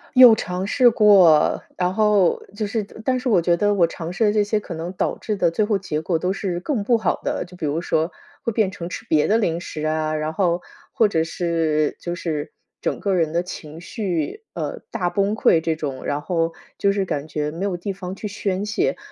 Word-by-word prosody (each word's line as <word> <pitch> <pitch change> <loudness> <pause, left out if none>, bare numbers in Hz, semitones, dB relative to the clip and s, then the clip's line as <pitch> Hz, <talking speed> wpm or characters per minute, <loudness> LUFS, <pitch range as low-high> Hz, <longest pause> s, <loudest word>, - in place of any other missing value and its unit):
有 250 -3 +10
尝 180 -2 -3
试 250 +1 +5
过， 200 -8 +5 0.2
然 180 0 0
后 210 -4 +3
就 210 0 -2
是 220 0 -1 0.2
但 255 -1 +2
是 250 0 -2
我 190 -6 +4
觉 170 +1 +3
得 205 +2 +2
我 180 -4 +5
尝 165 0 -6
试 220 - +1
的 210 - +3
这 210 -1 +3
些 210 +1 0
可 190 - -8
能 165 +2 -5
导 - - -1
致 215 - -2
地 175 -4 +2
最 215 - +1
后 210 -2 +1
结 160 -5 -3
果 165 0 0
都 180 +3 0
是 185 -3 -3
更 225 0 -2
不 235 +2 +3
好 220 - -1
的， - - -2
就 180 0 -14
比 160 - -3
如 150 +3 -1
说 160 0 0 0.3
会 230 - 0
变 205 -4 +1
成 170 -1 -6
吃 - - -7
别 150 -1 +3
的 220 - +3
零 170 -6 0
食 155 -3 -5
啊， 155 0 0
然 155 +1 -2
后， 175 -1 +1 0.3
或 220 - +4
者 160 -5 +1
是 160 -3 0
就 175 0 -4
是 155 -4 -3 0.3
整 - - -1
个 200 - 0
人 165 -4 +1
的 170 +1 0
情 160 -3 -8
绪， 185 - -3
呃， - - -4
大 175 -2 -1
崩 200 +1 +1
溃 165 -6 +4
这 165 0 0
种， 140 -4 -5
然 145 +1 -1
后 165 0 -1 0.3
就 200 - +3
是 200 -1 0
感 145 -3 -3
觉 150 -1 -2
没 170 +4 -5
有 185 -3 -1
地 195 +3 -4
方 185 0 -6
去 210 - -5
宣 200 -1 -2
泄， 380 - 0
180 Hz, 250 characters per minute, -22 LUFS, 165-205 Hz, 0.3 s, 有